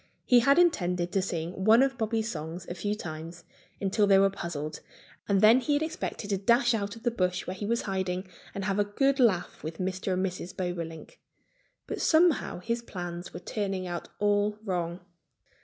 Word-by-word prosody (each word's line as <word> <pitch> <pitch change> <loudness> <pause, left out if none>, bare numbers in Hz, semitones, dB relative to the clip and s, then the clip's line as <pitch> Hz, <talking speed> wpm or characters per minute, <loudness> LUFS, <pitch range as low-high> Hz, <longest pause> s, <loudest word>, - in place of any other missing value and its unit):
He 245 - +6
had 275 +5 +4
intended 180 - +2
to 195 - +1
sing 175 0 -4
one 225 +5 +7
of 270 -1 0
Bobby's 225 -1 -1
songs 165 -1 -6
a - - -4
few 205 +4 -2
times, 170 -2 -7 0.4
until 200 +1 +2
they 195 -1 +6
were 195 0 +4
puzzled; 155 -6 -5 0.5
and 195 -1 +3
then 220 +4 +7
he 290 +3 0
had 290 +2 +2
expected 315 - -4
to 195 - +2
dash 240 +4 +4
out 205 0 -2
of 225 - -13
the 240 - +1
bush 180 -5 -1
where 185 - -4
he 200 +2 -5
was 235 +1 0
hiding 190 -1 -2 0.3
and 195 -1 -3
have 200 0 0
a - - +5
good 270 +7 +1
laugh 200 -8 +2
with 160 +1 -5
Mr. 185 0 -2
and 185 +1 +1
Mrs. 185 0 -6
Bobolink. 175 - -5 0.7
But - - -4
somehow 320 - +3
his 230 +4 -2
plans 175 -5 -6
were 175 - -8
turning 195 -1 -3
out 175 -1 -5
all 205 0 +1
wrong. 175 -3 -2
195 Hz, 190 wpm, -28 LUFS, 180-225 Hz, 0.7 s, one